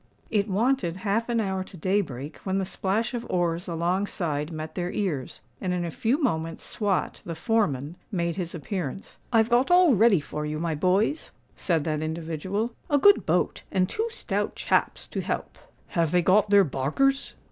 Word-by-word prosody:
It 210 Hz, -1 st, +2 dB
wanted 205 Hz, -3 st, +1 dB
half 225 Hz, +4 st, +1 dB
an 235 Hz, -1 st, +1 dB
hour 190 Hz, -3 st, -1 dB
to 185 Hz, -, -13 dB
day 190 Hz, +5 st, +2 dB
break, 140 Hz, -3 st, -7 dB
when 190 Hz, 0 st, -2 dB
the 195 Hz, -, 0 dB
splash 200 Hz, +6 st, -1 dB
of 240 Hz, -1 st, -3 dB
oars 175 Hz, -1 st, 0 dB
alongside 170 Hz, -3 st, -1 dB
met 155 Hz, 0 st, -6 dB
their 180 Hz, 0 st, -2 dB
ears; 160 Hz, -11 st, -3 dB, 0.2 s
and 180 Hz, -1 st, 0 dB
in 175 Hz, -1 st, -1 dB
a 170 Hz, -, -3 dB
few 235 Hz, -, +1 dB
moments 165 Hz, -, -1 dB
Swot, 205 Hz, -4 st, -1 dB
the 165 Hz, -, -5 dB
foreman, 160 Hz, -, 0 dB
made 170 Hz, -3 st, -1 dB
his 175 Hz, -3 st, -4 dB
appearance. 175 Hz, +1 st, -5 dB
"I've 225 Hz, 0 st, +3 dB
got 245 Hz, +2 st, +4 dB
all 355 Hz, -4 st, +6 dB
ready 215 Hz, -3 st, +5 dB
for 150 Hz, +1 st, -5 dB
you, 150 Hz, 0 st, -3 dB
my 165 Hz, 0 st, -1 dB
boys," 190 Hz, -, +1 dB, 0.2 s
said 165 Hz, -5 st, 0 dB
that 155 Hz, -1 st, -1 dB
individual; 165 Hz, +8 st, -3 dB, 0.2 s
"a 290 Hz, -, +4 dB
good 405 Hz, +8 st, +5 dB
boat, -, -, +1 dB
and 185 Hz, -1 st, +2 dB
two 440 Hz, -, -2 dB
stout 465 Hz, -, -2 dB
chaps -, -, 0 dB
to -, -, -4 dB
help." -, -, -4 dB, 0.3 s
"Have 170 Hz, -5 st, +1 dB
they 180 Hz, +2 st, +2 dB
got 200 Hz, +4 st, +4 dB
their 200 Hz, -1 st, +7 dB
barkers?" 175 Hz, -, 0 dB
185 Hz, 180 wpm, -26 LUFS, 165-220 Hz, 0.3 s, their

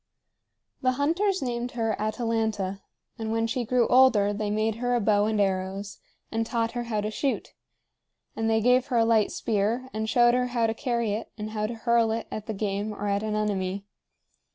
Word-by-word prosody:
The 255 Hz, 0 st, +2 dB
hunters 335 Hz, +7 st, +1 dB
named 245 Hz, -1 st, -3 dB
her 225 Hz, -3 st, 0 dB
Atalanta, 215 Hz, -3 st, -1 dB, 0.4 s
and 220 Hz, -1 st, -3 dB
when 225 Hz, 0 st, +1 dB
she 245 Hz, +2 st, -1 dB
grew 240 Hz, 0 st, +2 dB
older, 245 Hz, -6 st, +5 dB
they 210 Hz, 0 st, -2 dB
made 215 Hz, +1 st, 0 dB
her 245 Hz, +1 st, 0 dB
a -, -, +2 dB
bow 205 Hz, -1 st, +3 dB
and 215 Hz, -1 st, 0 dB
arrows, 195 Hz, 0 st, -1 dB, 0.3 s
and 225 Hz, 0 st, 0 dB
taught 230 Hz, 0 st, -1 dB
her 240 Hz, -1 st, -4 dB
how 215 Hz, -3 st, -1 dB
to 210 Hz, +1 st, -3 dB
shoot; 270 Hz, +4 st, -2 dB, 0.8 s
and 225 Hz, 0 st, 0 dB
they 220 Hz, 0 st, +2 dB
gave 250 Hz, +2 st, +3 dB
her 250 Hz, -4 st, 0 dB
a 225 Hz, -, +4 dB
light 225 Hz, -2 st, +3 dB
spear, 230 Hz, +4 st, -1 dB
and 220 Hz, 0 st, -2 dB
showed 240 Hz, +1 st, +5 dB
her 250 Hz, 0 st, +1 dB
how 240 Hz, -2 st, 0 dB
to 225 Hz, -, +1 dB
carry 235 Hz, -2 st, -1 dB
it 215 Hz, +3 st, -4 dB
and 215 Hz, 0 st, -5 dB
how 215 Hz, -1 st, -1 dB
to 235 Hz, -, -5 dB
hurl 235 Hz, 0 st, +2 dB
it 225 Hz, 0 st, -2 dB
at 215 Hz, -, -6 dB
the 220 Hz, -, -2 dB
game 205 Hz, +1 st, -2 dB
or 205 Hz, -, -4 dB
at 200 Hz, 0 st, +1 dB
an 215 Hz, -1 st, -2 dB
enemy. 200 Hz, -2 st, -1 dB
225 Hz, 200 wpm, -26 LUFS, 210-240 Hz, 0.8 s, older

